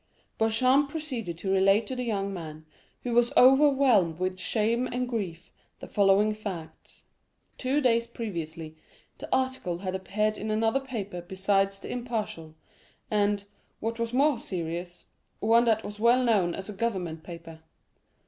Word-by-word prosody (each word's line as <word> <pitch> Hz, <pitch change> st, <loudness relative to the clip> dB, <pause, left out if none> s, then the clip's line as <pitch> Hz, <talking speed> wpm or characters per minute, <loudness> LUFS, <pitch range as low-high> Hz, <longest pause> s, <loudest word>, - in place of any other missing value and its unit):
Beauchamp 255 Hz, +6 st, +3 dB
proceeded 260 Hz, -, -4 dB
to 190 Hz, +2 st, -3 dB
relate 195 Hz, +3 st, +4 dB
to 260 Hz, -, -5 dB
the 250 Hz, -, -3 dB
young 200 Hz, -4 st, -2 dB
man, 155 Hz, -3 st, -8 dB, 0.4 s
who 245 Hz, -, -2 dB
was 240 Hz, 0 st, +3 dB
overwhelmed 260 Hz, -, +5 dB
with 185 Hz, +1 st, -2 dB
shame 230 Hz, +5 st, 0 dB
and 250 Hz, 0 st, -2 dB
grief, 190 Hz, -8 st, -4 dB, 0.3 s
the -, -, -8 dB
following 200 Hz, +1 st, +3 dB
facts. 195 Hz, -7 st, -8 dB, 0.6 s
Two 270 Hz, +3 st, +1 dB
days 235 Hz, -3 st, +2 dB
previously, 165 Hz, -9 st, -6 dB, 0.4 s
the -, -, -8 dB
article 260 Hz, -10 st, 0 dB
had 185 Hz, 0 st, -4 dB
appeared 210 Hz, +3 st, -1 dB
in 215 Hz, -, -4 dB
another 225 Hz, +4 st, +2 dB
paper 210 Hz, -9 st, -5 dB
besides 195 Hz, +2 st, 0 dB
_ -, -, -20 dB
l'Impartial_, 220 Hz, -10 st, -4 dB, 0.6 s
and, 205 Hz, -1 st, +1 dB, 0.3 s
what 230 Hz, +1 st, -3 dB
was 230 Hz, 0 st, -1 dB
more 275 Hz, 0 st, +3 dB
serious, 175 Hz, -3 st, -5 dB, 0.3 s
one 230 Hz, +2 st, +4 dB
that 220 Hz, -1 st, +2 dB
was 210 Hz, 0 st, -8 dB
well 240 Hz, +3 st, +4 dB
known 200 Hz, -8 st, +2 dB
as 190 Hz, -, -7 dB
a 210 Hz, -, -6 dB
government 190 Hz, -7 st, -2 dB
paper. 165 Hz, -1 st, -10 dB
210 Hz, 150 wpm, -28 LUFS, 185-235 Hz, 0.6 s, overwhelmed